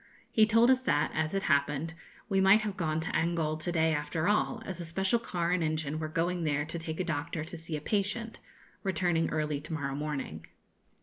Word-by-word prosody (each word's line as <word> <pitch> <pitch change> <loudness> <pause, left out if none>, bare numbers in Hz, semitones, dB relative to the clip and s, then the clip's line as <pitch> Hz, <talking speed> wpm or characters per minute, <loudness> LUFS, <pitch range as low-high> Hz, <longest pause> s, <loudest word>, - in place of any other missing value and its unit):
He 215 -1 +5
told 230 +3 +5
us 260 0 +3
that, 145 - +1
as 160 +3 -1
it 195 - 0
happened, 145 +3 +1 0.3
we 195 -3 +2
might 195 +3 +6
have 205 -2 -3
gone 160 -4 0
to 160 - -3
Angol 160 -2 0
to 165 +3 -2
day 160 -1 +2
after 150 +2 -1
all, 220 +3 +1
as 185 -2 -5
a - - -4
special 190 +7 +1
car 175 -6 -1
and 180 -2 +2
engine 155 -1 -1
were 155 - -2
going 170 +2 -1
there 150 -1 +1
to 165 +2 -5
take 160 0 -5
a - - +1
doctor 160 -1 -2
to 165 +2 -8
see 165 -1 -5
a - - -7
patient, 210 +5 -1 0.4
returning 175 -4 +1
early 150 -2 -1
to 155 +2 -7
morrow 140 -3 -2
morning. 135 - -4
165 Hz, 210 wpm, -30 LUFS, 155-190 Hz, 0.4 s, might